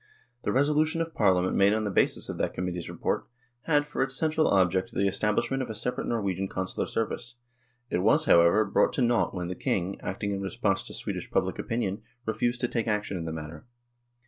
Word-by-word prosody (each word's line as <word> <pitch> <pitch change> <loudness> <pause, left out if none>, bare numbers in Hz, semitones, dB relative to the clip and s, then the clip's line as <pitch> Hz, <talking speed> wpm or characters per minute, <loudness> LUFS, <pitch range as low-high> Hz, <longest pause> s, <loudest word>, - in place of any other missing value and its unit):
The - - -1
resolution 150 +4 +2
of 165 0 -2
Parliament 95 -3 +2
made 100 +1 +5
on 110 0 0
the 105 - -1
basis - - +1
of - - -5
that - - -1
Committee's 90 -1 -3
report, - - -2 0.4
had 145 -2 +3
for 150 - -3
its 135 0 0
central 155 0 +2
object 95 +3 +2
the 100 - +1
establishment 110 +6 0
of 130 - -4
a 110 - -4
separate 125 +4 -2
Nor 115 -3 -1
wegian 95 0 -1
Consular 95 0 -3
service. 115 +1 -3 0.6
It - - +1
was, 145 - +3
however, 85 +1 +5
brought 100 - +2
to 130 - +1
nought 120 -4 +2
when 90 -1 -3
the 90 - -3
King, 95 +1 -2
acting 100 +2 -3
in 100 -1 -2
response 95 -2 0
to - - -6
Swedish - - -4
public - - 0
opinion, 110 -3 -2 0.2
refused 120 +3 -1
to 120 - +2
take 115 -1 -2
action 105 -2 -1
in 85 -2 -4
the 80 - -3
matter. 80 +3 -8
105 Hz, 205 wpm, -28 LUFS, 95-120 Hz, 0.6 s, made